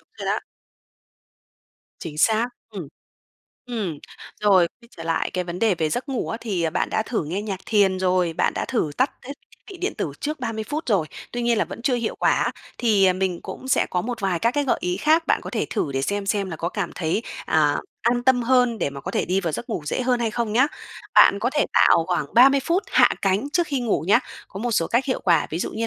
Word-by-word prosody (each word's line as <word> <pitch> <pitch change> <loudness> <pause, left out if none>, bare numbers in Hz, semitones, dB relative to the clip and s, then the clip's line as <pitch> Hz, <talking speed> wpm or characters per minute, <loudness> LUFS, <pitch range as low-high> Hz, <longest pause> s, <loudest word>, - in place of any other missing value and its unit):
Đúng - - -35
rồi - - -5
đó. - - +1 1.6
Chính 150 -3 -7
xác, 220 +7 +3 0.2
ừm. 190 -9 -7 0.8
Ừm, 205 -11 -3 0.4
rồi, 190 -4 +4
quay 235 - -19
trở 165 - -8
lại 165 0 -1
cái 180 -1 -2
vấn 175 0 -5
đề 220 -3 +3
về 160 -2 -1
giấc 250 - -3
ngủ 265 -3 -2
á, 225 - -3
thì 180 -8 -1
bạn - - -1
đã - - +1
thử 220 -7 -2
nghe 180 +7 -3
nhạc 195 -3 -4
thiền 195 -3 +3
rồi, 180 -2 +1
bạn - - +1
đã - - -2
thử 225 - -1
tắt 260 - +2 0.2
hết 275 - -5 0.2
thiết - - -22
bị 385 - -9
điện 365 +3 -3
tử - - -2
trước 300 0 -3
30 225 -3 -3
phút 300 +6 -4
rồi, 195 -8 +2 0.3
tuy 245 - -3
nhiên 235 -1 +2
là - - +2
vẫn - - -9
chưa 265 0 +2
hiệu 235 -2 -2
quả - - +2
á, - - 0 0.3
thì 200 -6 +4
mình 185 -2 -2
cũng 260 - -8
sẽ - - +3
có 180 - 0
một 240 +1 -4
vài 190 -3 0
các 230 +6 +2
cái 290 +1 0
gợi 265 - +1
ý 180 0 -1
khác, 320 +2 +2
bạn - - +2
có - - -7
thể - - -1
thử 140 - -1
để 135 0 -1
xem 200 +6 -2
xem 200 -2 -1
là 165 - -5
có 170 - -2
cảm 185 -2 -3
thấy, 175 +5 -1 0.2
à, 150 -2 +3 0.3
an 240 +1 +1
tâm 250 -1 +3
hơn 245 -1 +3
để - - -1
mà 140 0 -8
có - - -5
thể - - 0
đi 185 +2 0
vào 170 -4 -2
giấc 240 - -5
ngủ 215 -8 -3
dễ 255 - -1
hơn 250 -1 +1
hay 230 -2 0
không 230 -1 -2
nhá. 250 +5 +4 0.5
Bạn 200 - +7
có 235 +5 0
thể 295 - +3
tạo 165 - +5
khoảng 175 -5 -1
30 270 +4 +7
phút 350 +4 +1
hạ - - +6
cánh 200 +8 +1
trước 345 0 +2
khi 280 -4 -2
ngủ 235 -8 0
nhá. 215 - +6 0.3
Có 195 - -8
một 240 +2 -1
số 165 -7 +1
cách 240 +3 +1
hiệu 260 - -1
quả, 170 -3 +3
ví 160 - -3
dụ - - -2
như 230 +1 -2
215 Hz, 255 wpm, -23 LUFS, 180-245 Hz, 1.6 s, Bạn